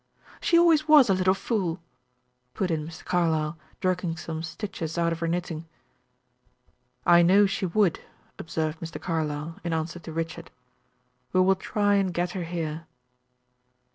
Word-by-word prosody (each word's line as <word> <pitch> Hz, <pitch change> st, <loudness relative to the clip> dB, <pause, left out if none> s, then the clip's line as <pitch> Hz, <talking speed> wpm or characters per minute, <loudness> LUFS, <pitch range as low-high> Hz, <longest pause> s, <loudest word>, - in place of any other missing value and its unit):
"She 335 Hz, -, +3 dB
always 325 Hz, -3 st, +5 dB
was 290 Hz, -8 st, +7 dB
a -, -, +5 dB
little 185 Hz, 0 st, +2 dB
fool," 190 Hz, -5 st, -2 dB, 0.8 s
put 185 Hz, -3 st, -1 dB
in 155 Hz, -2 st, -1 dB
Miss 160 Hz, +1 st, -10 dB
Carlyle, 160 Hz, -3 st, 0 dB, 0.3 s
jerking 180 Hz, -3 st, -1 dB
some 160 Hz, 0 st, -5 dB
stitches 165 Hz, -1 st, -5 dB
out 170 Hz, 0 st, +2 dB
of 165 Hz, -, -6 dB
her 165 Hz, -, -1 dB
knitting. 165 Hz, -1 st, -3 dB, 1.4 s
"I 175 Hz, 0 st, +7 dB
know 190 Hz, +4 st, +6 dB
she 195 Hz, -1 st, -1 dB
would," 180 Hz, -1 st, +2 dB, 0.4 s
observed 160 Hz, -1 st, -3 dB
Mr. 165 Hz, 0 st, -6 dB
Carlyle, 155 Hz, -1 st, -3 dB
in 170 Hz, -1 st, -2 dB
answer 160 Hz, +2 st, -3 dB
to 165 Hz, -, -9 dB
Richard. 165 Hz, +1 st, -4 dB, 0.8 s
"We 185 Hz, -, +4 dB
will 190 Hz, +1 st, +5 dB
try 205 Hz, +1 st, +1 dB
and 195 Hz, -2 st, +1 dB
get 175 Hz, 0 st, 0 dB
her 180 Hz, -2 st, -4 dB
here." 165 Hz, -1 st, -4 dB
170 Hz, 150 wpm, -26 LUFS, 160-190 Hz, 1.4 s, was